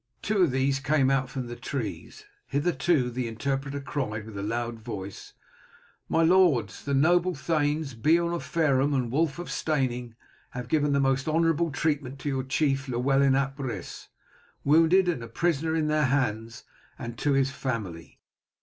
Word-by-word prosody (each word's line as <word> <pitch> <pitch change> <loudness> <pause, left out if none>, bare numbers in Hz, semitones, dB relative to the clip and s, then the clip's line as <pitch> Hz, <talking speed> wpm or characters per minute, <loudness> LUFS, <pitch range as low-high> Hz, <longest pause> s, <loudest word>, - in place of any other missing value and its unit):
Two 210 -1 0
of 175 - +5
these 135 +1 +1
came 140 -1 +2
out 135 -1 +1
from 130 -3 -4
the 120 0 -7
trees. 120 -2 -6 0.2
"Hitherto," 145 -3 +1
the 125 0 -3
interpreter 135 +5 -3
cried 125 -7 -4
with 110 -2 -10
a 100 - -4
loud 115 +2 -3
voice, 100 -3 -7 0.8
"my 165 - +3
lords, 175 -7 +3
the 140 -1 -1
noble 175 +5 +3
thanes, 150 -1 -1
Beorn 165 +8 +2
of 170 - -2
Fareham 145 -3 +1
and 125 -3 -1
Wulf 150 +2 +1
of 175 - -6
Steyning, 125 -6 -1 0.4
have 125 0 -5
given 145 -2 +2
the 140 - +3
most 135 0 +1
honourable 165 +1 +2
treatment 140 -1 -1
to 140 +2 -4
your 135 -1 -1
chief, 135 0 0
Llewellyn 135 +2 +2
ap 135 +1 -1
Rhys, 120 -10 -6 0.6
wounded 165 +5 +5
and 165 -9 0
a 115 - -7
prisoner 160 +5 0
in 160 -1 +1
their 150 -1 +2
hands, 115 -4 -1 0.3
and 120 0 -6
to 145 - +1
his 135 -1 +2
family. 105 - -5
135 Hz, 165 wpm, -27 LUFS, 125-155 Hz, 0.8 s, of